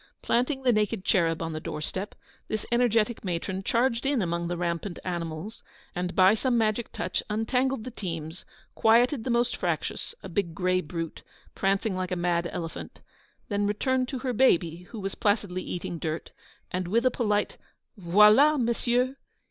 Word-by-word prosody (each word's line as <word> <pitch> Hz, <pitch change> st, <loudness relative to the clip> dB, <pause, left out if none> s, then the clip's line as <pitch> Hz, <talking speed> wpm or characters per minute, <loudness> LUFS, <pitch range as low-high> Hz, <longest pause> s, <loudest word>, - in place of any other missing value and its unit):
Planting 265 Hz, +3 st, +1 dB
the 250 Hz, -2 st, +4 dB
naked 210 Hz, -2 st, 0 dB
cherub 165 Hz, -4 st, +2 dB
on 165 Hz, 0 st, -3 dB
the 155 Hz, -, -3 dB
door 150 Hz, -, -5 dB
step, 190 Hz, +6 st, -4 dB, 0.3 s
this 215 Hz, -1 st, -3 dB
energetic 235 Hz, -2 st, +2 dB
matron 185 Hz, +1 st, -2 dB
charged 235 Hz, +3 st, +1 dB
in 275 Hz, -1 st, +1 dB
among 170 Hz, 0 st, -1 dB
the 175 Hz, 0 st, -2 dB
rampant 170 Hz, +1 st, -2 dB
animals, 170 Hz, +3 st, -4 dB, 0.3 s
and 180 Hz, 0 st, -3 dB
by 190 Hz, +2 st, +6 dB
some 240 Hz, +2 st, +1 dB
magic 220 Hz, +1 st, 0 dB
touch -, -, -2 dB
untangled 250 Hz, +3 st, 0 dB
the 255 Hz, -, -6 dB
teams, 165 Hz, -6 st, -5 dB, 0.3 s
quieted 235 Hz, +3 st, +4 dB
the -, -, -2 dB
most 240 Hz, 0 st, +2 dB
fractious, -, -, -2 dB
a -, -, -6 dB
big 175 Hz, -6 st, -2 dB
grey 185 Hz, 0 st, +1 dB
brute, 165 Hz, 0 st, -5 dB, 0.3 s
prancing 195 Hz, +1 st, 0 dB
like 185 Hz, -1 st, -2 dB
a -, -, +1 dB
mad 175 Hz, -1 st, 0 dB
elephant; 165 Hz, -2 st, -6 dB, 0.5 s
then 205 Hz, -1 st, 0 dB
returned 255 Hz, +5 st, +1 dB
to 265 Hz, -, -4 dB
her 255 Hz, 0 st, -2 dB
baby, 175 Hz, -8 st, +2 dB
who 225 Hz, -, -7 dB
was 195 Hz, -1 st, -3 dB
placidly 205 Hz, -3 st, 0 dB
eating 175 Hz, -2 st, -5 dB
dirt, 160 Hz, +1 st, -4 dB, 0.4 s
and 180 Hz, -1 st, -2 dB
with 230 Hz, +7 st, +1 dB
a 255 Hz, -, +5 dB
polite 210 Hz, -4 st, 0 dB, 0.4 s
'_Voilà, 210 Hz, -, +6 dB
messieurs! 245 Hz, +2 st, +1 dB
205 Hz, 165 wpm, -27 LUFS, 175-235 Hz, 0.5 s, by